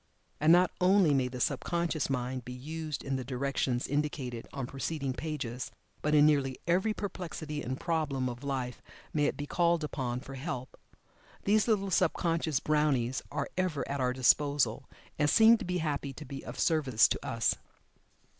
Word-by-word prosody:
And 155 +2 +5
not 175 +1 +6
only 185 -4 +5
may 130 -2 +2
the 125 0 -6
sub 135 +1 +1
conscious 170 -4 -1
mind 130 -1 -2
be 125 - -7
used 155 +4 -5
in 135 -1 -1
the 130 - -4
directions 130 -1 -1
indicated 140 -5 -2
on 135 - -4
preceding 135 +1 -3
pages, 130 -5 -4 0.3
but 150 0 +2
in 145 0 +7
nearly 140 -4 +2
every 185 +5 +2
perplexity 170 -7 -5
and 130 +2 -4
problem 150 -6 -1
of 120 +1 -6
life 130 -3 -3 0.3
may 150 -1 +2
it - - 0
be 145 - -4
called 170 +1 +2
upon 125 -5 -2
for 135 +1 -10
help. 130 -2 -5 0.7
These 210 +2 +3
little 200 -4 +1
sub 175 -1 +3
conscious 165 -4 0
brownies 145 -5 +1
are 140 -1 -2
ever 180 -6 -1
at 140 -1 -2
our 125 0 +2
disposal, 130 -1 +2 0.3
and 145 0 +3
seem 225 +4 +7
to 215 - -5
be 180 0 -1
happy 145 -4 -2
to 150 +3 -9
be 135 -2 -7
of - - -8
service 140 -9 +4
to - - -3
us. - - +1
145 Hz, 175 wpm, -31 LUFS, 130-165 Hz, 0.7 s, in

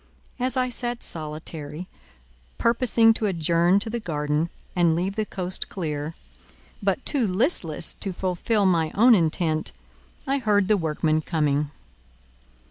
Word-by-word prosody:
As 255 0 0
I 255 0 +1
sat 240 0 -2
solitary, 155 +1 -6 0.7
purposing 230 -1 +4
to 220 -1 -1
adjourn 170 +1 +2
to 225 - -4
the 235 - -2
garden 150 -3 -1 0.3
and 170 -2 +3
leave 185 +4 -1
the 215 -1 -1
coast 185 -1 -3
clear, 155 -3 -4 0.7
but - - 0
too 265 -7 +1
listless 185 - 0
to 195 - +1
fulfil 190 +4 0
my 165 -4 +2
own 235 +4 +7
intent, 160 -3 +1 0.5
I 275 0 0
heard 205 -5 +2
the 215 - +5
workmen 155 -3 0
coming. 150 -3 0
180 Hz, 130 wpm, -24 LUFS, 155-225 Hz, 0.7 s, own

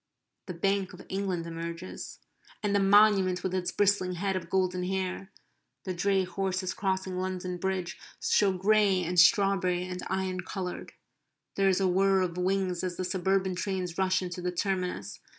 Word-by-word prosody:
The 180 - -5
Bank 195 +2 0
of 180 - -12
England 190 -3 -2
emerges; 165 - -6 0.5
and 205 -1 +1
the - - +4
Monument 195 -2 +4
with 185 - -2
its 180 -1 -1
bristling 200 -3 +2
head 195 +2 -1
of 170 -2 -4
golden 185 -1 0
hair; 190 +1 -3 0.5
the 185 - -3
dray 190 +2 +1
horses 185 0 -2
crossing 190 -1 -2
London 185 -1 -3
Bridge 190 -1 -2 0.2
show 200 -2 +3
grey 195 0 +3
and 180 +1 +1
strawberry 185 0 +4
and 180 0 -5
iron 190 -1 -1
coloured. 185 -1 -6 0.6
There 195 0 +2
is 185 - +2
a 190 - +2
whir 190 +1 +3
of 175 -2 -1
wings 185 0 0
as 180 -1 -2
the 185 - -2
suburban 190 +1 0
trains 185 -1 -3
rush 185 0 +2
into 180 0 -5
the 180 0 -1
terminus. 180 - -2
185 Hz, 165 wpm, -29 LUFS, 180-195 Hz, 0.6 s, the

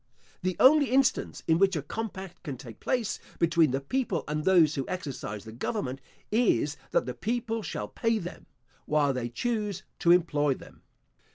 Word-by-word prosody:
The 185 -1 -1
only 285 +2 +7
instance 265 +1 +1
in 160 0 +4
which 195 -1 +4
a 150 - -2
compact 190 +1 -6
can 140 -4 -5
take 120 -4 -11
place 240 -5 -1 0.2
between 165 -2 +4
the 135 +2 0
people 190 - -1
and 150 +1 -2
those 170 -5 +5
who 135 -3 -3
exercise 140 - -5
the 110 - -9
government, 130 - -3 0.3
is, 195 - +2
that - - +1
the 125 - -4
people 225 - -2
shall - - -4
pay 225 0 0
them, 180 -3 -7 0.4
while 145 -2 +3
they 125 -2 -3
choose 210 - -2 0.2
to 170 - +2
employ 150 -5 +4
them. - - -15
170 Hz, 170 wpm, -28 LUFS, 140-220 Hz, 0.4 s, only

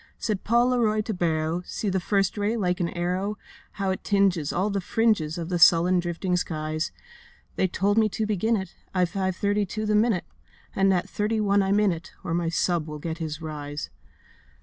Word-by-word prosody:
Said 210 -4 -2
Paul 240 +2 +3
Leroy 220 -4 +2
to 215 +1 -3
Barrow, 165 -1 0
'See 210 - -4
that 190 0 +1
first 195 +1 +1
ray, 210 +2 0
like 180 -4 0
an 170 -2 0
arrow, 185 +4 -2 0.4
How 195 -1 -1
it 190 - -4
tinges 195 -7 +2
all 195 +4 0
the 200 -1 -1
fringes 210 -7 +1
Of 170 0 -4
the 175 -1 0
sullen 175 +2 +6
drifting 175 +1 -1
skies. 155 -2 -2 0.6
They 185 - +2
told 200 +4 +1
me 215 -1 +3
to 215 +2 -2
begin 215 +2 +1
it 190 -3 -6 0.2
At 180 -2 +2
five 190 0 -1
thirty 205 +2 +1
to 215 +4 -3
the 210 - +1
minute, 210 -3 +2 0.5
And 195 0 +3
at 180 0 +1
thirty 210 +2 -1
one 205 -1 +3
I'm 195 +1 +2
in 210 -2 +3
it, 170 +1 -7
Or 165 - -3
my 170 -1 0
sub 170 -1 0
will 150 0 -6
get 160 +2 -5
his 160 0 -5
rise. 145 -1 -5
185 Hz, 200 wpm, -26 LUFS, 170-210 Hz, 0.6 s, sullen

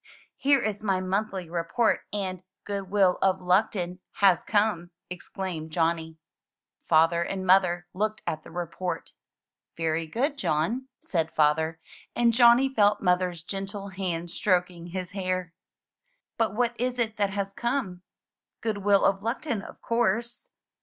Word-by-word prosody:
''Here 280 -2 +4
is 210 -1 -2
my 195 -3 +1
monthly 190 -1 -2
report 170 +8 0
and 190 -3 -3 0.2
'Goodwill 195 -2 +1
of 190 -1 +3
Luckton' 180 -1 +1
has 190 -4 +4
come,'' 205 -5 +1 0.2
exclaimed 180 -2 -5
Johnny. 160 0 -1 0.7
Father 165 +1 +4
and 185 +2 -3
mother 180 -2 +4
looked 215 +3 -2
at 155 - -2
the - - -12
report. 175 +1 -4 0.7
"Very 165 0 -1
good, 275 - -1
John," 230 - 0
said 165 -3 -1
Father; 160 +1 +2 0.4
and 235 -1 +3
Johnny 240 +2 +6
felt 210 -5 +3
Mother's 180 -2 +1
gentle 195 +2 -5
hand 175 -3 -3
stroking 180 -2 0
his 180 0 -5
hair. 185 -3 -2 0.8
"But 225 -4 0
what 240 0 +1
is 250 0 -1
it 225 -2 -1
that 200 -1 +1
has 195 0 -3
come?" 235 -6 -2 0.3
" - - -64
'Goodwill 205 -2 +2
of 195 0 +2
Luckton', 230 0 -2
of - - -12
course." 235 0 0
190 Hz, 135 wpm, -27 LUFS, 175-215 Hz, 0.8 s, Johnny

